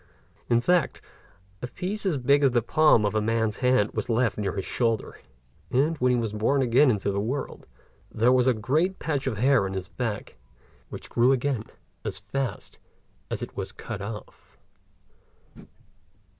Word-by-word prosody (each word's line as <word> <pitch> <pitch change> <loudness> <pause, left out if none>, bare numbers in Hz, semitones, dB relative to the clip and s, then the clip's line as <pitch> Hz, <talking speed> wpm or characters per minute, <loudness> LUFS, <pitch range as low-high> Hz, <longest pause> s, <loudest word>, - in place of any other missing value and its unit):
In 120 0 +3
fact, 175 -1 +1 0.6
a 125 - -3
piece 195 +9 -4
as 165 -6 +1
big 140 +3 +3
as 140 - +5
the 120 -2 +1
palm 150 -5 +4
of 105 - 0
a 110 - +1
man's 110 -1 0
hand 125 -5 +2
was - - -3
left 115 0 +1
near 100 -3 -2
his 95 - -3
shoulder; 115 -3 -1 0.5
and 145 +6 +2
when 125 0 +3
he 125 - +2
was 115 -3 -2
born 130 +6 +1
again 130 +4 +4
into 100 -3 0
the 100 - -1
world, 125 +7 -4 0.4
there 115 +3 +3
was 130 0 +3
a 130 - +4
great 155 - 0
patch 145 -4 -2
of 115 -5 -2
hair 130 +1 +3
on 95 - -5
his 95 -1 -5
back, 105 - -4 0.5
which - - -8
grew 120 +3 +4
again 130 -4 0 0.4
as - - -4
fast 105 +4 -5 0.5
as - - -3
it - - -8
was 95 0 -4
cut 105 +1 -7
off. 105 +1 -9
120 Hz, 170 wpm, -26 LUFS, 105-135 Hz, 0.6 s, as